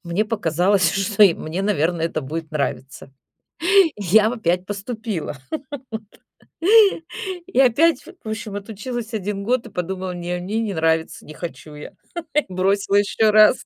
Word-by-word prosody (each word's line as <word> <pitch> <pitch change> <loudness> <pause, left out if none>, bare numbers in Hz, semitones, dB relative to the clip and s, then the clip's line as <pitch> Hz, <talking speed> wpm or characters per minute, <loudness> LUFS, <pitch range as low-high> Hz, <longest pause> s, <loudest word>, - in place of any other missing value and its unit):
мне 175 +5 0
показалось, 185 -3 +2
что 200 +2 +1
и 195 -4 +8
мне, 165 +5 -4
наверное, 170 -4 +1
это 155 - -3
будет 155 +3 -6
нравиться. 135 -3 -4 0.9
Я 205 +2 +4
в - - -3
опять 180 -5 0
поступила. 205 - -5 0.5
Вот. 220 0 -5 1.4
И 375 - -1
опять, 280 +6 +4 0.2
в 220 - -6
общем, 215 -1 -5
отучилась 220 +3 -6
1 200 -1 -3
год 240 +2 0
и - - -14
подумала: 185 +1 -4
"Не, 175 0 -3
мне 200 +5 -2
не 215 -3 -2
нравится". 160 0 0
Не 155 - -10
хочу 160 -3 -8
я. 150 - -10 0.6
Бросила 195 +2 +1
еще 205 +2 +3
раз. 215 +3 +5
195 Hz, 145 wpm, -21 LUFS, 170-215 Hz, 1.4 s, и